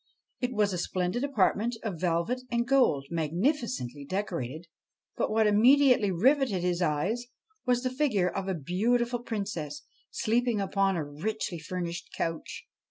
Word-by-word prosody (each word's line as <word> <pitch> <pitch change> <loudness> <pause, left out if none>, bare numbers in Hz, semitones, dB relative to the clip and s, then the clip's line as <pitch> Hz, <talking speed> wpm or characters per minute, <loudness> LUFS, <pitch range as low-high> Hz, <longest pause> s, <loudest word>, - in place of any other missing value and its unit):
It 250 0 -1
was 210 -4 +1
a 180 - -2
splendid 185 +8 -1
apartment 230 -3 +1
of 195 -8 -4
velvet 180 +8 0
and 235 0 0
gold, 250 - +3
magnifi 175 - +1
cently 140 - -5
decorated; 170 -6 -3 0.5
but - - 0
what 220 0 +3
immediately 245 +1 +5
riveted 220 - +2
his 180 0 0
eyes 185 +10 0 0.4
was 245 0 +2
the 255 - 0
figure 255 -10 +2
of 190 +1 -3
a 190 - 0
beautiful 235 - 0
princess 195 -11 -4 0.3
sleeping 235 0 +1
upon 195 0 +1
a 160 -3 -2
richly 175 +4 -3
furnished 170 +1 -5
couch. 325 - -4
200 Hz, 145 wpm, -29 LUFS, 170-245 Hz, 0.5 s, immediately